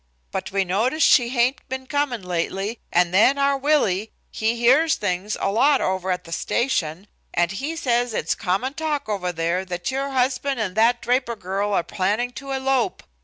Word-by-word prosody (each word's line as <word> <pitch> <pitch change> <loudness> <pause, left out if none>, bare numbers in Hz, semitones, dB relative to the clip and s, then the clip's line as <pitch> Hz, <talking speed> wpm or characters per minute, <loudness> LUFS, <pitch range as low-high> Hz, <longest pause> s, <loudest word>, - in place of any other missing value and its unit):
But - - -4
we 195 0 +1
noticed 240 - +1
she 240 -2 +5
hain't 250 +1 +1
been 260 0 -4
comin' 275 -6 -1
lately, 190 +5 -3
and 175 0 +2
then 235 +8 +5
our 280 0 +2
Willie, 260 -8 +1 0.2
he 220 +2 0
hears 265 +7 +4
things 200 +1 -2
a 195 - 0
lot 275 +6 +4
over 190 0 -1
at 180 -1 -1
the 165 - -13
station, 180 - -1 0.3
and 175 +1 +2
he 280 +12 -4
says 245 -7 0
it's - - 0
common 220 +7 -1
talk 300 -2 -2
over 195 -4 -2
there 170 +2 -1
that 180 +4 -4
your 275 +1 -2
husband 265 0 0
and 200 -4 -2
that 235 +2 +3
Draper 245 -1 0
girl 200 +1 -2
are 175 - +2
planning 210 +8 -1
to 275 +2 -9
elope. 265 -5 0
235 Hz, 180 wpm, -23 LUFS, 190-265 Hz, 0.3 s, she